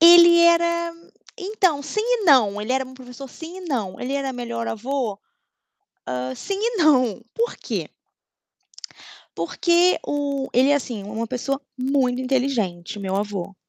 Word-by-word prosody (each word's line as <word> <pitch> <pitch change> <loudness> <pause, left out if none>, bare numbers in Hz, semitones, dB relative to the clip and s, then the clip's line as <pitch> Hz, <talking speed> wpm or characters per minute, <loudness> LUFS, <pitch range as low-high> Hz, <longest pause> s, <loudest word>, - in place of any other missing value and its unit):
Ele 340 0 +9
era 340 0 +3 0.4
então, 370 -7 0
sim 310 +9 -2
e 475 -2 0
não, 225 - +5
ele 215 +5 -2
era 265 0 +1
meu 260 0 -13
professor, 255 +1 -10
sim 330 +7 -10
e - - -9
não. 230 - -3
Ele 255 +2 -3
era 275 -1 -1
o - - -7
melhor 235 -1 -4
avô? 235 -2 -3 0.9
Hã, 125 0 -3
sim 395 - -4
e 465 +1 0
não, 255 - +3
porquê? 470 +1 -3 1.5
Porque 350 +1 +2
o 280 -2 -2
ele 260 +3 +4
é - - +5
assim, 240 -7 -3
uma 220 +3 -4
pessoa 265 +3 -3 0.2
muito 255 -1 +1
inteligente, 245 -9 -1
meu 195 -1 -2
avô. 200 -2 -3
265 Hz, 150 wpm, -23 LUFS, 230-340 Hz, 1.5 s, Ele